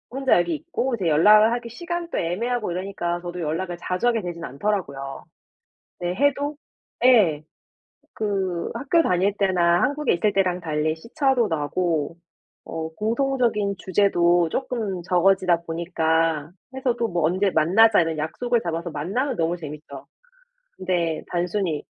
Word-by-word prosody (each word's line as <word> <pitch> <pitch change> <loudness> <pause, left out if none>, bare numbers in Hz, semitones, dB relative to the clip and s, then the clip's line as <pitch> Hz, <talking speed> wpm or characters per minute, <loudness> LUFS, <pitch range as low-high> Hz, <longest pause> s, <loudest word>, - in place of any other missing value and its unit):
혼자 265 +2 +2
여기 245 - 0
있고 290 -5 -2
이제 190 -6 -2
연락을 210 +8 +6
하기 240 -1 -4
시간도 345 +7 -4
애매하고 215 +5 -1
이러니까 175 -1 -3
저도 175 0 -6
연락을 175 +3 -3
자주 180 +6 -2
하게 230 -2 +2
되진 175 -2 -6
않더라고요. 140 -3 -3 0.8
네 175 0 -2
해도 285 +5 0 0.5
예. 190 -12 +5 0.7
그 190 -5 -2
학교 280 +8 +2
다닐 190 - +1
때나 175 -3 +2
한국에 295 0 +1
있을 205 +4 +1
때랑 185 -2 +1
달리 155 -2 -1
시차도 245 - 0
나고 160 0 -1 0.5
어 160 0 -5
공통적인 230 -2 0
주제도 175 -3 +2
쪼끔 225 -6 -3
적어지다 180 -1 +3
보니까 165 -2 0 0.2
해서 260 -2 0
또 235 - 0
뭐 170 -5 0
"언제 185 +5 +2
만나자." 195 +7 +5
이런 165 -1 -2
약속을 240 +11 -1
잡아서 170 -1 -4
만나면 205 - -2
너무 165 +1 0
재밌죠. 150 -3 -9 0.7
근데 175 -4 -1
단순히 175 -2 -1
180 Hz, 305 characters per minute, -23 LUFS, 165-230 Hz, 0.8 s, 연락을